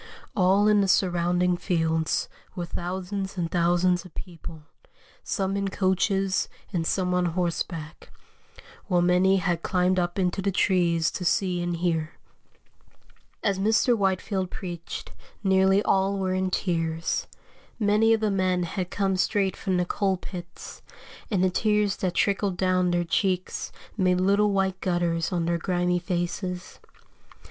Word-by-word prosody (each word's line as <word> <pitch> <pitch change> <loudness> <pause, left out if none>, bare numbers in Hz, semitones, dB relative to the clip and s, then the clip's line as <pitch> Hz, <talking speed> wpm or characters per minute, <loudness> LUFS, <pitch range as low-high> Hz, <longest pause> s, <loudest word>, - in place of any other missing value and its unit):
All 195 +2 +4
in 210 -1 +5
the 195 - +1
surrounding 180 -1 +2
fields 160 -3 0 0.3
were 175 - -3
thousands 190 +3 -4
and 170 -2 -2
thousands 175 0 +2
of 180 - -15
people, 165 -3 -9 0.6
some 195 -2 -1
in 200 0 -1
coaches 190 0 +1 0.2
and 165 -2 -1
some 180 -2 0
on 180 0 +2
horseback, 170 -2 -3 0.8
while 180 -3 +2
many 180 +2 +4
had 175 -3 0
climbed 185 0 +1
up 175 +1 -2
into 185 0 0
the 200 - 0
trees 170 -4 +2
to 185 - -5
see 180 0 +1
and 175 0 -1
hear." 165 -2 -1 1.3
As 195 -2 +1
Mr. 220 +4 +3
Whitefield 190 -1 -1
preached, 175 -3 -7 0.3
nearly 190 +1 +4
all 195 +1 +2
were 190 -1 -1
in 185 0 0
tears. 165 -3 -1 0.5
Many 215 +1 +3
of 225 -1 +3
the 215 -1 +1
men 185 -2 +1
had 180 +1 -3
come 195 -1 0
straight 195 0 +1
from 190 -3 -1
the 180 - +1
coal 190 +1 0
pits, 175 -1 -9 0.5
and 190 -4 +1
the 185 - +3
tears 210 0 +1
that 180 -2 -2
trickled 200 -2 +1
down 185 -1 +2
their 175 0 +1
cheeks 185 +1 -1 0.2
made 185 -3 +2
little 200 +3 +3
white 190 -1 0
gutters 175 -2 0
on 175 -2 0
their 170 0 0
grimy 180 0 0
faces. 180 +1 -4
185 Hz, 145 wpm, -26 LUFS, 175-195 Hz, 1.3 s, in